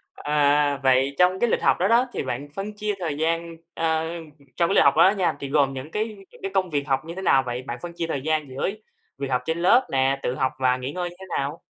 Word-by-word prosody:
À,vậy 140 -2 +2
trong 180 +1 +4
cái 240 - +2
lịch - - +1
học - - +3
đó 185 - +2
đó, 240 +3 +4
thì - - -2
bạn 130 +3 -4
phân 205 +2 -4
chia 210 0 -2
thời 155 -5 -3
gian 165 +1 -1 0.2
ờ, 160 -1 0 0.5
trong 170 0 +2
cái 200 - +1
lịch - - +6
học - - +5
đó 185 - +7
nha 180 - +1
thì 140 - -5
gồm 140 -2 +2
những 135 +4 -7
cái 215 +2 -1 0.2
những - - -18
cái 195 0 -4
công 185 -2 +1
việc 145 -1 -2
học 135 -1 +1
như 170 +1 -7
thế 190 - -5
nào 135 -7 +4
vậy? 125 +1 -3
Bạn 120 -2 -5
phân 175 - -6
chia 165 - -3
thời 140 -4 -2
gian 155 -1 -1
giữa 135 +8 -2 0.5
việc 140 - -3
học 125 0 +1
trên 160 +1 -1
lớp 230 +9 +4
nè, 135 0 +2
tự 125 - -1
học 130 0 0
và 130 -1 +2
nghỉ 130 +2 -5
ngơi 175 +1 -3
như 175 - -15
thế 190 - -9
nào? 145 +5 -3
150 Hz, 265 wpm, -24 LUFS, 135-180 Hz, 0.5 s, đó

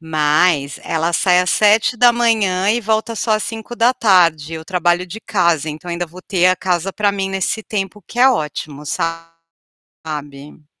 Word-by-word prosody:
Mas 155 -2 +1
ela 165 +1 -1
sai 180 +1 +3
às 180 0 0
7h 220 -3 +3
e 235 +2 +1
volta 220 +1 -1
só 220 +1 -1
às 215 0 +1
17h, 215 - +1
eu 160 0 -8
trabalho 175 0 0
de 210 +5 -9
casa, 170 -8 0
então 155 +3 -7
ainda 175 +1 -3
vou 175 +3 -13
ter 185 -1 +1
a 185 - +3
casa 180 +1 -2
para 205 0 0
mim 195 -1 -3
nesse 195 +3 -2
tempo, 205 -1 -5
que 240 - -10
é 260 +2 +6
ótimo, 150 - -3 1.0
sabe? 150 -1 -10
185 Hz, 155 wpm, -18 LUFS, 160-215 Hz, 1.0 s, é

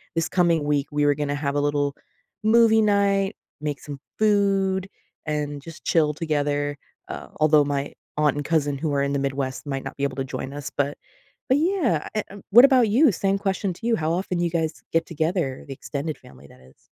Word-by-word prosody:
this 165 -1 0
coming 170 -4 +2
week, 145 -1 +1
we 145 0 +1
were 145 0 +4
gonna 145 0 -2
have 140 -1 -2
a - - +2
little 145 0 0 0.5
movie 220 0 +5
night, 200 -1 +2 0.2
make 150 -1 -3
some 145 -2 -8 0.2
food, 195 -3 +2 0.4
and 150 -2 -3
just 165 +2 -11
chill 155 -3 +2
together, 145 -2 -1 0.3
uh, - - -6
although 155 -1 +5
my 140 0 -2 0.2
aunt 150 -2 +3
and 145 -1 -3
cousin 145 -3 +1
who 150 +1 -2
are 140 - +1
in 140 0 -1
the 140 - 0
Midwest 135 -1 -3
might 135 -2 -3
not - - -7
be 140 - -3
able 140 -2 -1
to 135 - -1
join 135 +1 -6
us, 145 -1 -5
but 140 0 -1 0.5
but 265 - +5
yeah, 340 - +1
eh, 215 - 0
uh, 200 - -10
what 240 +5 +9
about 260 -5 +5
you? 250 +5 +5
Same 195 +2 0
question 195 -1 -1
to 225 - -8
you, 235 - +3
how 155 0 -1
often 180 0 -2
do 175 - +1
you 170 - 0
guys 160 -1 -2
get 165 - +2
together, 160 -4 -2
the 140 - -8
extended 145 +3 -4
family 70 +1 -16
that 65 - -18
is? 65 +1 -22
155 Hz, 210 wpm, -24 LUFS, 145-195 Hz, 0.5 s, what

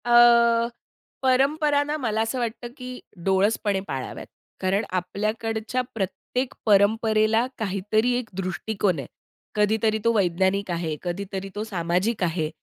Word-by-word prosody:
अ, 235 -1 +6 0.5
परंपरा 285 +3 +3
ना 295 +1 -2
मला 220 -6 0
असं 225 +3 -1
वाटतं, 240 0 -3
की 250 -1 -7 0.3
डोळसपणे 195 +1 +2
पाळाव्यात 130 -1 -5 0.3
कारण 195 +3 +1 0.2
आपल्याकडच्या 220 +5 -2
प्रत्येक 225 +5 -3
परंपरेला 215 +2 +4
काहीतरी 215 +3 0
एक 245 -3 -4
दृष्टिकोन 190 -1 -1
आहे. 135 - -6 0.5
कधीतरी 215 +1 +2
तो 230 - +5
वैज्ञानिक 190 0 +1
आहे, 165 -2 -2
कधीतरी 195 +2 -4
तो 210 - -2
सामाजिक 185 +1 -1
आहे. 165 -2 0
215 Hz, 120 wpm, -25 LUFS, 190-235 Hz, 0.5 s, अ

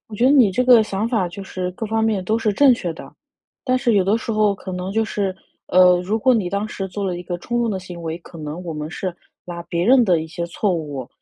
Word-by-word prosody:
我 220 - -9
觉 235 +4 0
得 265 - +6
你 255 -8 +6
这 250 +7 0
个 245 -3 +7
想 210 +1 -2
法 215 -7 0
就 195 +3 -8
是 185 -1 -4
各 220 +4 -5
方 220 +1 0
面 210 -4 0
都 220 +4 +1
是 215 -2 0
正 270 +4 +5
确 175 -6 -4
的。 - - -12 0.5
但 255 -1 +2
是 240 -3 +1
有 195 - +4
的 210 +4 +2
时 225 - -4
候 215 -2 +2
可 185 0 -8
能 180 +1 -4
就 225 +1 +1
是 195 -3 -2 0.3
呃， 180 -1 +5
如 210 +5 -1
果 255 +2 +3
你 190 -6 0
当 200 +2 -1
时 195 -2 -5
做 200 +2 -4
了 180 -2 -2
一 175 - -7
个 175 0 -5
冲 240 +6 -3
动 235 - 0
的 195 - -2
行 180 -2 -9
为， 165 +1 -4
可 170 - -14
能 155 +3 -6
我 165 - -4
们 150 +1 -5
是 185 -1 -4 0.3
拿 170 -1 -7
别 170 0 -2
人 250 0 +5
的 175 -5 +2
一 - - -7
些 170 +1 -5
错 185 +3 -1
误， 145 -6 -5
195 Hz, 300 characters per minute, -21 LUFS, 175-220 Hz, 0.5 s, 个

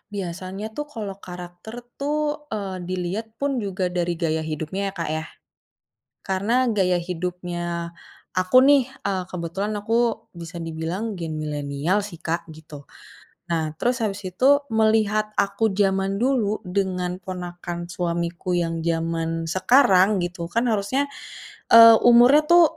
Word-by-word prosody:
Biasanya 185 +2 -5
tuh 295 +6 -5
kalau 205 -4 -5
karakter 180 +4 -9 0.2
tuh, 295 +1 -2
eee, 195 -7 -4
dilihat 185 +4 -3
pun 275 +1 -1
juga 190 -3 -2
dari 175 -1 -1
gaya 160 -1 -1
hidupnya 160 +4 -4
ya, - - -3
Kak, 165 -3 -3
ya. 155 0 -2 1.0
Karena 195 +3 -1 0.2
gaya 185 -4 +2
hidupnya 175 -1 -4 0.4
aku 185 +5 +1
nih, 275 -2 +5 0.2
eee, 190 -2 -1
kebetulan 180 +4 -3
aku 210 +2 -2 0.4
bisa 170 0 -9
dibilang 165 +4 -4 0.2
gen 160 -2 -4
milenial 150 +4 -1
sih, 175 - -10
Kak, 170 +1 -3
gitu. 150 -2 -12 0.6
Nah 160 -2 0
terus 245 +1 +1
habis 200 -2 -2
itu 255 - +2 0.3
melihat 215 -1 +2
aku 200 +2 +1
zaman 195 0 +1
dulu 235 -6 +1
dengan 180 -1 -1
ponakan 175 -1 -6
suamiku 170 0 -2
yang 165 0 -2
zaman 165 0 -1
sekarang 195 -2 +5
gitu 170 -1 -5
kan 230 +6 +1
harusnya, 220 +7 0 0.7
eee, 230 0 +11 0.2
umurnya 245 +5 +7
tuh 345 0 +8
185 Hz, 130 wpm, -23 LUFS, 170-215 Hz, 1.0 s, eee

